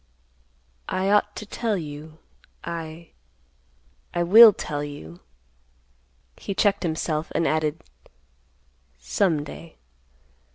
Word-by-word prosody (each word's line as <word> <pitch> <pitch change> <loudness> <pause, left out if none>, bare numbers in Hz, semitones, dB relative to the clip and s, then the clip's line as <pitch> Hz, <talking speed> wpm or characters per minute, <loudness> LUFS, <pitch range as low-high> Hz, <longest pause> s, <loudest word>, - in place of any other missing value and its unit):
I 190 +1 0
ought 210 0 +2
to 215 - -7
tell 220 0 -2
you—I—I 160 +1 -9 1.1
will 220 +6 +9
tell 145 -6 -5
you—" 90 - -9 1.2
he 200 - -5
checked 200 0 +2
himself 160 -2 -2
and 165 - +1
added, 155 +1 -1 1.1
"some 155 - 0
day." 165 +2 -11
165 Hz, 85 wpm, -24 LUFS, 150-195 Hz, 1.2 s, will